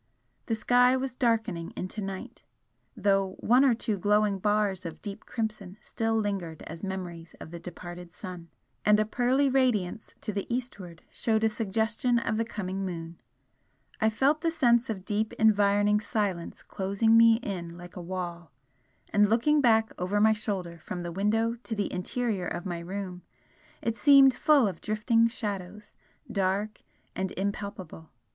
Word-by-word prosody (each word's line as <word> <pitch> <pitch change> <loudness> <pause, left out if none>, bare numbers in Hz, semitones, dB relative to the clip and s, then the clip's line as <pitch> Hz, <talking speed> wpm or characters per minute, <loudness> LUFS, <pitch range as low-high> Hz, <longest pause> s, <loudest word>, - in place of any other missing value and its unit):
The 225 - +1
sky 250 +3 +4
was 260 -1 -3
darkening 225 -9 0
into 185 +4 -4
night, 195 -1 -6 0.6
though 195 -2 +1
one 250 +3 +4
or 260 -4 +4
two 215 -3 -2
glowing 205 0 +2
bars 205 -2 +1
of 165 -2 -7
deep 205 0 -8
crimson 215 -4 -4
still 225 0 -2
lingered 195 -7 -2
as 165 +1 -9
memories 175 -4 -6
of - - -10
the 170 - -7
departed 175 0 -9
sun 180 -3 -9 0.3
and 210 0 +5
a 215 - +2
pearly 250 +5 +2
radiance 235 -7 0
to 215 - -4
the 200 +3 -4
eastward 200 -9 -5
showed 220 -1 0
a 220 - +4
suggestion 220 +3 0
of 220 -2 -1
the 230 - +1
coming 195 -3 -4
moon. 165 -2 -6 0.8
I 220 - +3
felt 275 +7 +2
the 335 - +2
sense 245 -6 +3
of 195 -4 -4
deep 215 +1 -1
environing 205 -1 +3
silence 205 -6 -3
closing 200 +4 +1
me 230 0 +7
in 175 -7 -5
like 175 0 -11
a 180 - -6
wall 175 -2 -5 0.6
and 205 0 +4
looking 290 +7 +3
back 225 -3 +3
over 185 +3 0
my 220 +1 +5
shoulder 185 -5 -4
from 175 +3 -6
the 175 0 -5
window 215 +5 +1
to 230 - -4
the 205 -2 -2
interior 195 0 -2
of 175 - -4
my 175 -2 -3
room 180 +1 -6 0.6
it 230 - 0
seemed 270 +4 +7
full 285 -5 +4
of 185 -4 -5
drifting 225 +2 +2
shadows, 205 -3 -6 0.4
dark 200 +1 -1 0.3
and 190 0 -2
impalpable. 195 -4 -5
205 Hz, 160 wpm, -28 LUFS, 185-225 Hz, 0.8 s, me